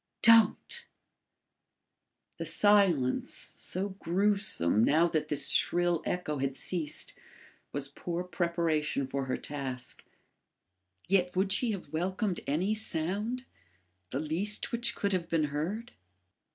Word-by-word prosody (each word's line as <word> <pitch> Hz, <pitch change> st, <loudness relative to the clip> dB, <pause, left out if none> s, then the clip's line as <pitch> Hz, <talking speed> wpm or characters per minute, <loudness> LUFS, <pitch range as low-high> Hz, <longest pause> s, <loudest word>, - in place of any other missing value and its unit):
DON'T!" 230 Hz, -2 st, +4 dB, 1.5 s
The -, -, -3 dB
silence, 190 Hz, -11 st, +2 dB
so 190 Hz, +3 st, -3 dB
gruesome, 190 Hz, -, +1 dB
now 160 Hz, +7 st, +4 dB
that 155 Hz, -2 st, -1 dB
this 150 Hz, -2 st, 0 dB
shrill 175 Hz, -1 st, +2 dB
echo 150 Hz, -5 st, -2 dB
had 135 Hz, 0 st, -2 dB
ceased, 160 Hz, -4 st, -1 dB, 0.6 s
was 140 Hz, -1 st, -4 dB
poor 170 Hz, +5 st, -5 dB
preparation 170 Hz, -5 st, -1 dB
for 135 Hz, +1 st, -3 dB
her 130 Hz, -, -2 dB
task. 130 Hz, -3 st, -5 dB, 1.0 s
Yet 180 Hz, -1 st, +2 dB
would 190 Hz, +1 st, +2 dB
she 240 Hz, +3 st, +4 dB
have 175 Hz, -6 st, -8 dB
welcomed 185 Hz, +3 st, -1 dB
any 175 Hz, +9 st, 0 dB
sound 215 Hz, +5 st, 0 dB, 0.6 s
the 135 Hz, -, -3 dB
least 170 Hz, +8 st, +2 dB
which 235 Hz, 0 st, +1 dB
could 200 Hz, -1 st, -1 dB
have 180 Hz, -2 st, -2 dB
been 165 Hz, -2 st, +1 dB
heard? 200 Hz, +11 st, -3 dB
175 Hz, 115 wpm, -30 LUFS, 150-200 Hz, 1.5 s, DON'T